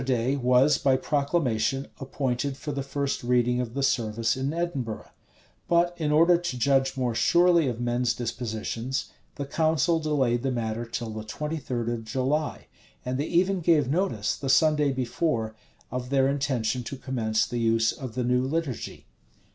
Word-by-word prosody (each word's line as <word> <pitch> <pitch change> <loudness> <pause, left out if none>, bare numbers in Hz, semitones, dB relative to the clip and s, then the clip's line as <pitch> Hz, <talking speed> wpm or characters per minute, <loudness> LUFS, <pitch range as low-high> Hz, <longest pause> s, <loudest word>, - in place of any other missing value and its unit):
Easter 130 0 0
day 125 +4 0
was, 130 +2 +4
by 135 -1 +3
proclamation, 140 -3 0
appointed 135 0 -2
for 150 - -5
the 140 -1 -3
first 140 0 -2
reading 125 0 +2
of 120 0 -6
the 140 - -1
service 115 -3 +1
in 135 +2 -2
Edinburgh: 155 -10 -3 0.6
but 175 +1 +3
in 155 -3 -1
order 170 +3 +5
to 170 -7 -4
judge 135 +1 +2
more 125 -2 0
surely 170 +4 +4
of 120 -2 -3
men's 120 0 0
dispositions, 120 +1 -3 0.2
the 140 - -4
council 160 +2 +1
delayed 135 -6 +1
the 135 - -1
matter 115 -2 -2
till 115 -1 -5
the 110 0 -6
twenty 150 +9 -4
third 120 -5 -3
of 120 -1 -2
July; 135 +7 -1 0.4
and 130 +1 -2
they 145 - -1
even 185 +2 +2
gave 160 -5 +3
notice, 150 - 0
the 135 - -5
Sunday 150 0 +4
before, 120 -3 -1 0.4
of 125 0 -4
their 135 -1 +3
intention 130 -4 0
to 135 +3 -6
commence 115 -5 0
the 120 - -4
use 115 0 +2
of 130 -5 -8
the 125 - -1
new 125 +1 +2
liturgy. 140 -2 -3
130 Hz, 170 wpm, -26 LUFS, 120-150 Hz, 0.6 s, order